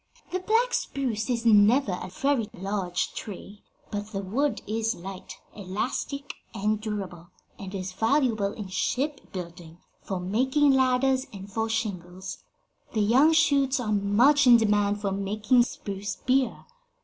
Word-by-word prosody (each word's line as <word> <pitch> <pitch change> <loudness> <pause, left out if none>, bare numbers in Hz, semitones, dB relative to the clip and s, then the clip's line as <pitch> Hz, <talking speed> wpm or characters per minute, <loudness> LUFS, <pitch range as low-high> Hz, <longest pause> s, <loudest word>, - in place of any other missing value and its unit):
The 370 - -1
black 455 +6 +1
spruce 245 -5 -2
is 235 -1 -1
never 220 +2 +5
a 180 +1 -5
very 235 +2 0
large 190 -1 -2
tree, 205 0 -8 0.3
but 205 0 -3
the - - -2
wood 270 +10 -1
is 225 +2 -1
light, 190 +1 -8 0.2
elastic 230 +8 -4 0.2
and 210 +1 0
durable, 195 -6 -5 0.3
and 195 0 -7
is 185 -1 -4
valuable 225 -2 +1
in 205 -2 -7
shipbuilding, 180 - -4 0.2
for 190 -2 -4
making 260 +10 +2
ladders 260 0 +2
and 195 0 -10
for 225 +1 -1
shingles. 190 -5 -4 0.5
The 220 - +1
young 255 +9 +5
shoots 280 -4 +3
are 225 -4 -2
much 235 +8 +4
in 240 -1 +9
demand 205 -2 +2
for 200 -2 -1
making 210 +5 +2
spruce 200 -3 -5
beer. 255 -2 0
215 Hz, 135 wpm, -26 LUFS, 195-260 Hz, 0.5 s, in